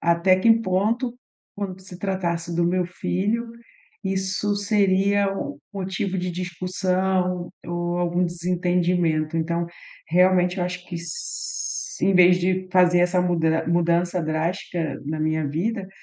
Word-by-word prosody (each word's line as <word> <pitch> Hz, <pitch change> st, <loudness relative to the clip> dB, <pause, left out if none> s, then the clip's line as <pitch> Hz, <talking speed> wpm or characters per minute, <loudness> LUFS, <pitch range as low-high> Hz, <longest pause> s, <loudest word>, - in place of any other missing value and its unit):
até 170 Hz, +2 st, +3 dB
que 225 Hz, +5 st, +4 dB
ponto, 225 Hz, +6 st, 0 dB, 0.4 s
quando 190 Hz, -2 st, -5 dB
se 185 Hz, -1 st, -11 dB
tratasse 170 Hz, -3 st, -2 dB
do 170 Hz, 0 st, +2 dB
meu 180 Hz, 0 st, +1 dB
filho, 205 Hz, +6 st, -2 dB, 0.5 s
isso 195 Hz, +2 st, -1 dB
seria 200 Hz, -1 st, +2 dB
o 140 Hz, -5 st, -5 dB, 0.2 s
motivo 190 Hz, 0 st, -2 dB
de 180 Hz, 0 st, -2 dB
discussão 180 Hz, 0 st, -1 dB, 0.2 s
ou 175 Hz, 0 st, -2 dB
algum 175 Hz, +1 st, +1 dB
desentendimento. 175 Hz, -2 st, 0 dB
Então, 170 Hz, +1 st, -1 dB, 0.4 s
realmente 180 Hz, +1 st, +3 dB
eu 175 Hz, -, +1 dB
acho 180 Hz, 0 st, -5 dB
que 175 Hz, -, -6 dB
s 170 Hz, -, -5 dB, 0.5 s
em 195 Hz, -, +3 dB
vez 180 Hz, 0 st, +7 dB
de 185 Hz, +1 st, 0 dB
fazer 180 Hz, -1 st, +5 dB
essa 180 Hz, 0 st, +3 dB
muda 160 Hz, -3 st, +1 dB
mudança 170 Hz, +1 st, +1 dB
drástica 160 Hz, -1 st, -2 dB
na 155 Hz, +1 st, -2 dB
minha 155 Hz, -1 st, 0 dB
vida, 190 Hz, +6 st, -2 dB
180 Hz, 130 wpm, -23 LUFS, 170-190 Hz, 0.5 s, vez